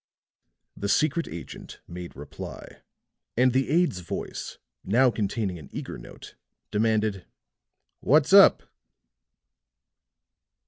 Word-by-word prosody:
The 100 - -3
secret 155 +7 +2
agent 85 - -9
made 85 0 -8
reply; 70 +1 -9 0.6
and 125 0 +4
the 130 0 +1
aide's 165 - +2
voice, 85 - -6 0.3
now 125 +5 +4
containing 100 -4 -2
an 75 - -13
eager - - -6
note, - - -12 0.4
demanded: 110 -3 0 0.7
"What's 150 +5 +3
up?" 200 -1 +8
110 Hz, 95 wpm, -26 LUFS, 90-135 Hz, 0.7 s, up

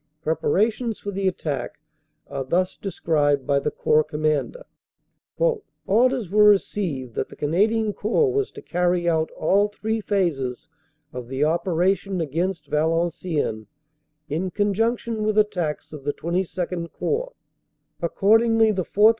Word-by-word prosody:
Preparations 210 +9 0
for 205 - -6
the 195 0 -1
attack 155 -7 -3 0.5
are 135 -1 -4
thus 180 +7 0
described 145 -7 0
by 140 -1 +2
the 150 - -1
Corps 155 +1 +2
Commander: 155 - -1 1.2
"Orders 240 -1 +2
were 210 +1 +5
received 180 - +1
that - - -3
the - - -12
Canadian 210 +8 +1
Corps 390 - +1
was 415 0 0
to - - -10
carry 180 0 0
out 160 -1 +1
all 200 +6 +3
three 220 +2 -3
phases 160 - -1 0.4
of 125 -1 -6
the 135 +3 -1
operation 180 +4 +1
against 165 +2 -2
Valenciennes 160 -6 -1 0.6
in 165 +6 -2
conjunction 220 +3 0
with 215 0 0
at 210 0 +4
tacks 160 -6 -3
of 150 -3 -8
the 145 +1 -2
XXII 175 0 -2
Corps. - - -2 0.7
Accordingly, 225 +5 +4
the 190 -3 -1
4th. 210 +2 +5
180 Hz, 130 wpm, -23 LUFS, 155-210 Hz, 1.2 s, were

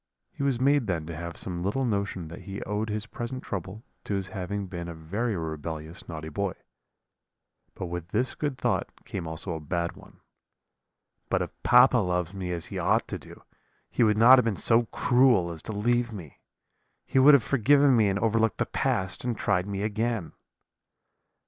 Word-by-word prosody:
He - - -9
was 135 -4 +1
made 140 -1 +3
then 85 -5 -1
to 85 0 -6
have 85 +1 -6
some 85 -2 -4
little 105 +9 0
notion 100 -6 -2
that 85 - -9
he 100 0 -5
owed 105 +2 -2
his 105 0 -3
present 120 +4 -6
trouble 100 +3 -5 0.2
to 100 - -1
his 95 -1 -3
having 100 0 -4
been 85 -2 -6
a 85 - -6
very 100 +9 -2
rebellious 80 +3 -6
naughty 80 -2 -6
boy; 95 +3 -2 1.2
but - - -5
with 85 -1 -5
this 120 +8 0
good 145 -4 -3
thought - - 0 0.2
came 90 -4 -5
also 80 +3 -4
a 80 - -4
bad 85 +3 -2
one: - - -17 1.1
'But - - +1
if - - -7
papa 125 0 +6
loves 90 -2 -1
me 95 -2 -4
as 85 -2 -3
he - - -5
ought - - +2
to - - -4
do, - - -14 0.5
he - - -1
would 105 -2 +4
not 125 +4 +8
have 125 - +1
been 110 -3 0
so 115 +4 +3
cruel 120 -10 +3
as 80 -2 -8
to - - -6
leave 120 +3 +1
me. 90 -9 -10 0.7
He 135 - +2
would 140 +2 +9
have 130 - +3
forgiven 140 +2 +4
me 110 -3 +4
and 100 0 +1
overlooked 115 +1 +1
the - - 0
past, 95 0 -1
and 120 -3 -2
tried 95 -2 0
me 100 0 -3
again.' 110 -5 -1
100 Hz, 190 wpm, -27 LUFS, 85-120 Hz, 1.2 s, would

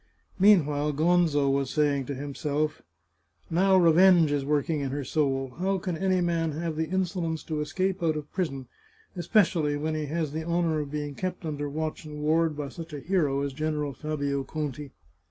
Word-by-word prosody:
Mean 195 -5 +6
while 150 0 -1
Gonzo 160 -2 +3
was 135 -1 0
saying 145 -3 +1
to 140 - -3
himself: 145 +2 -2 0.3
" 80 - -46 0.3
Now 190 +3 +4
revenge 175 -2 +6
is 145 -1 0
work 145 0 0
ing 160 -3 0
in 140 -1 -2
her 140 +2 -3
soul. 135 -3 -1
How 195 +1 +1
can 180 -1 -3
any 185 +1 +1
man 165 -2 0
have 165 +1 -3
the 160 0 -2
insolence 175 -3 -1
to 155 -2 -3
escape 185 +5 -1
out 160 -2 +1
of 150 -1 -8
prison, 135 -8 -2 0.5
especially 170 -6 +2
when 155 +2 -2
he 155 -1 -2
has 155 0 -2
the 160 +2 -3
honour 170 -1 0
of 145 -2 -4
being 145 0 -4
kept 185 +3 -4
under 145 -2 -3
watch 155 +2 -4
and 150 -1 -8
ward 160 0 +2
by 145 -2 -4
such 165 0 -9
a 145 - -4
hero 145 -4 0
as 140 -1 -2
General 150 -1 -2
Fabio 140 -1 -2
Conti 145 0 -5
155 Hz, 190 wpm, -27 LUFS, 145-170 Hz, 0.5 s, Mean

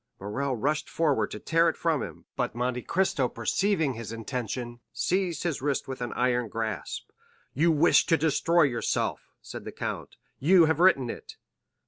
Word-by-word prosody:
Morrel 125 +7 -2
rushed 145 +6 -1
forward 155 -4 +1
to - - -6
tear 165 0 +3
it - - -4
from 160 -5 +1
him, - - -8
but - - -2
Monte 125 +1 -1
Cristo 155 -8 +1
perceiving 160 - 0
his 115 -2 -7
intention, 120 +1 -4
seized 170 +7 -1
his 165 -7 -2
wrist 140 0 -1
with 130 -1 -5
his 120 -1 -3
iron 125 -1 +1
grasp. 110 -2 -4 0.4
"You 165 +5 +3
wish 160 +2 +4
to 165 - +4
destroy 160 +2 +3
yourself," 120 -5 -1
said - - -8
the - - -7
count; - - -5 0.2
"you 170 +4 +6
have 160 0 +1
written 135 -10 +4
it." - - -10
140 Hz, 165 wpm, -27 LUFS, 120-165 Hz, 0.4 s, you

